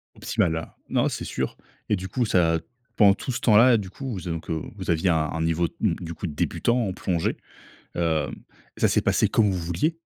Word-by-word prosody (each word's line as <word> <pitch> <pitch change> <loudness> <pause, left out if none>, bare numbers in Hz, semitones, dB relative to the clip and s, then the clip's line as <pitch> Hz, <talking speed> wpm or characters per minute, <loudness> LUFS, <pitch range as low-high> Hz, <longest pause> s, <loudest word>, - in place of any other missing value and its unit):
Optimal. 80 -1 0
Ah, 80 - -7
non, - - +2
c'est - - -4
sûr 65 - -3 0.3
et 105 - +2
du 95 +1 -6
coup, 120 +5 0
ça 85 -5 +3 0.4
pendant 100 -3 +7
tout 130 - -4
ce - - -3
temps-là, 115 +2 +6
du 95 -3 -6
coup, 135 +4 -7
vous 95 - -4
donc 80 -2 -5
heu, 80 -2 -1
vous - - -3
aviez 85 +2 +2
un 80 - +3
un 80 +1 -1
niveau, 85 +1 +1
mmh, 100 -7 +2
du 85 -2 -6
coup, 90 - -5
débutant, 115 +9 0
en 95 - -2
plongée. 90 -3 -1 0.6
Hem 80 -4 0 0.4
et - - -10
ça - - +6
s'est - - +2
passé - - +2
comme 105 -3 +3
vous 95 - -1
vouliez? 90 - -1
90 Hz, 220 wpm, -25 LUFS, 80-105 Hz, 0.6 s, pendant